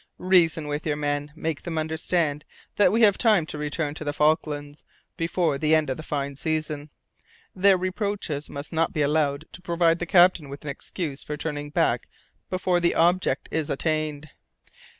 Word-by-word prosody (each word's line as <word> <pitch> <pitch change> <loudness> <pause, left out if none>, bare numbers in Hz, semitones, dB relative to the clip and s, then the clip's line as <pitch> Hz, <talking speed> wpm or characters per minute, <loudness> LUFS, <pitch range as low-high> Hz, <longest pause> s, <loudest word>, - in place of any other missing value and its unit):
Reason 170 -4 +3
with 145 +1 -3
your 150 -3 -1
men. 145 0 -2
Make 160 -2 -3
them 165 -2 -5
understand 155 -1 -1 0.3
that 205 - +5
we 225 +3 +2
have 205 -3 +5
time 215 -8 +4
to 155 - -7
return 150 0 -2
to 155 - -7
the 145 -1 -2
Falklands 150 -1 0 0.3
before 165 -3 0
the 155 +1 +3
end 155 -4 +1
of 130 - -3
the - - -6
fine 140 -3 -3
season. 155 0 -3 0.7
Their 195 0 +5
reproaches 185 -5 -3
must 140 +4 -7
not 165 0 +1
be 150 - +1
allowed 145 0 +1
to 175 - -11
provide 170 -1 +2
the 175 - -3
captain 175 -4 +5
with 140 +2 -9
an 145 - -3
excuse 150 -1 -5
for 150 - -5
turning 145 -1 -4
back - - +1 0.4
before 185 -1 +1
the 170 0 +2
object 175 +3 +2
is 160 -2 -1
attained." 155 0 -1
155 Hz, 175 wpm, -25 LUFS, 145-175 Hz, 0.7 s, that